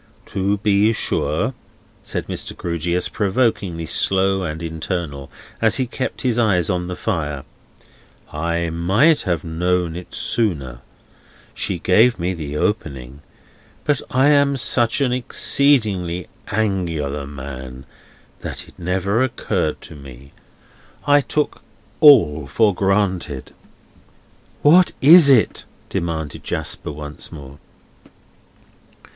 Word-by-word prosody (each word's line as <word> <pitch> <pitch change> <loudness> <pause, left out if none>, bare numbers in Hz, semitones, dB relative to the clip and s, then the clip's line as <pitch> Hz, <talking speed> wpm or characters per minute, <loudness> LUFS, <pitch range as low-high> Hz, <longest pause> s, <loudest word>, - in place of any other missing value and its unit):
"To 100 +1 0
be 105 +2 +2
sure," - - -1 0.5
said - - -4
Mr. - - -5
Grewgious, 85 +1 -2
provokingly 100 -5 -1
slowly 95 +1 +2
and 80 +2 -6
internally, 80 -4 -4 0.3
as 110 -1 +3
he 130 - 0
kept 130 +1 -5
his 120 -2 +1
eyes 95 -8 +2
on 90 -1 -2
the 90 - -5
fire: 75 -10 -3 0.9
"I 85 +2 -2
might 100 - +3
have 85 -2 -1
known 85 0 -1
it 90 0 -9
sooner; 70 - -1 0.7
she 95 - -3
gave 110 +8 +3
me 90 +2 -2
the 75 -4 -5
opening; 70 - -3 0.6
but 145 -2 0
I 130 +3 +3
am 140 -1 +3
such 120 0 +2
an 125 -3 +1
exceedingly 110 - +2 0.2
Angular 85 -9 -2
man, 65 -2 -9 0.5
that - - -6
it - - -19
never 95 +6 0
occurred 100 -10 -2
to - - -11
me; 70 -1 -13 0.7
I 145 0 +5
took 150 +2 -2 0.4
all 85 - +6
for 105 - +2
granted." 95 -7 -1 1.1
"What 175 +5 +5
is 155 +1 +8
it?" 125 -5 +3 0.2
demanded 80 -3 -4
Jasper - - -3
once 75 0 -8
more. 70 -3 -11
90 Hz, 115 wpm, -20 LUFS, 80-110 Hz, 1.1 s, is